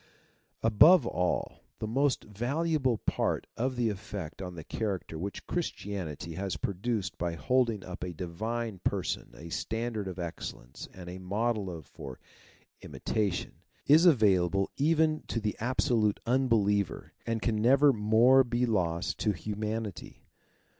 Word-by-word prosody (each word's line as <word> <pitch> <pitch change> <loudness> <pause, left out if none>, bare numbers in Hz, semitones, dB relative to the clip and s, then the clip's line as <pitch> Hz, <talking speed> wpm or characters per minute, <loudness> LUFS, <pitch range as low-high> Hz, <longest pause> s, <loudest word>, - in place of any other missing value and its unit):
" - - -41
^jove 125 - +7
ally 90 +1 -1 0.2
the., - - -4
most 135 +4 +1
valuable 130 +4 0
part - - -1
of 130 +2 -1
the 120 -2 +1
effect, 100 -5 -6
on 90 -1 -6
the 80 - -7
character 95 -7 -3
which 100 +4 -5
Christianity 95 - -4
has 95 -1 -3
produced 100 +2 -2
by 85 -1 -1
holding 115 -1 +1
up 90 -1 -7
in 90 - -3
a - - -6
Divine 110 +5 -3
Person - - -2
a 85 +5 -9
standard 110 +2 -3
of 95 -1 -6
excellence 80 -7 -6
and 90 -2 -11
a 90 +1 -7
model 100 -2 -1
for 65 -2 -10 0.6
imitation, 105 -4 -2 0.2
is 160 +5 +7
available 95 - +3
even 155 +1 +2
to 115 - -1
the 105 -1 -2
absolute 120 -3 +1
unbeliever 110 -7 +1
and 115 -1 0
can 110 -3 +1
never 135 +4 +6
more 115 +5 +5
be 120 0 0
lost 90 -7 0
to 105 - +1
humanity. 105 +2 -5
105 Hz, 140 wpm, -30 LUFS, 95-120 Hz, 0.6 s, ^jove